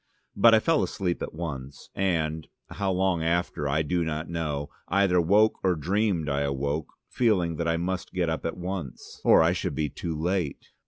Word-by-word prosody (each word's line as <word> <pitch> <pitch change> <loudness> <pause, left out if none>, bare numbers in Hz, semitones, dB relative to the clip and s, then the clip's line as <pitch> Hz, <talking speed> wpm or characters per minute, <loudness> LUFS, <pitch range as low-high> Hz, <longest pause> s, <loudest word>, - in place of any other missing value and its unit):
But 115 -1 +7
I - - +5
fell 160 +6 +2
asleep 90 -4 -2
at - - -5
once, 70 -5 -7
and 80 -5 -1 0.2
how 100 -1 -2
long 95 -2 +1
after 85 -3 0
I 75 +3 +1
do 85 +3 0
not 80 +1 -3
know 75 -4 -3 0.2
either 95 -1 +3
woke 105 +6 +3
or 90 -2 +3
dreamed 90 +1 0
I 70 -1 0
awoke, 70 +2 -1 0.2
feeling 90 -9 +1
that 85 - -1
I 85 0 +1
must 90 +2 -3
get 90 -2 0
up 80 0 -2
at 80 - -3
once, 90 -7 -6
or - - +6
I 85 +2 +3
should - - -3
be 75 -1 -1
too 80 +3 -5
late. 85 -3 -2
85 Hz, 190 wpm, -27 LUFS, 75-95 Hz, 0.2 s, But